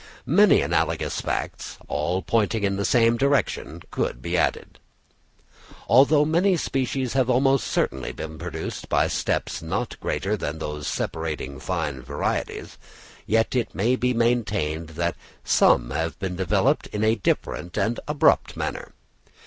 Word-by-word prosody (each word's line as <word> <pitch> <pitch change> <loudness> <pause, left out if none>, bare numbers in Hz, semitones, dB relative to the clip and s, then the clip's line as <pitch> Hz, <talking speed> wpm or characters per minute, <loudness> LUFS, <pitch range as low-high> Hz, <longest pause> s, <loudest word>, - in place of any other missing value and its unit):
Many - - +5
analogous - - 0
facts, - - -4
all 85 +6 -1
pointing 110 +2 +1
in 100 -1 +1
the 100 0 -1
same 115 -1 +4
direction, 140 +2 0
could - - -2
be - - -3
added. - - -1 1.1
Although 140 +6 +6
very 155 - -2
many 180 +2 +3
species 130 -3 -1
have 130 -2 +2
almost 135 +1 +3
certainly 65 -1 -1
been 80 0 -7
produced 90 +2 -6
by - - +3
steps - - -2
not 100 +9 -3
greater 100 +3 -1
than 75 -6 -4
those 75 -2 -5
separating 75 -4 -3
fine 70 -1 -3
varieties; - - -3 0.5
yet 115 +3 +2
it 120 -3 -1
may 115 +6 +2
be 125 0 0
maintained 105 -10 0
that 85 0 0 0.3
some - - +3
have 80 +3 -2
been 95 -2 -4
developed 90 -2 +1
in 105 0 -3
a 110 0 +4
different 90 -4 -2
and 115 +2 0
abrupt 150 -1 +2
manner. - - -4
105 Hz, 140 wpm, -24 LUFS, 80-125 Hz, 1.1 s, Although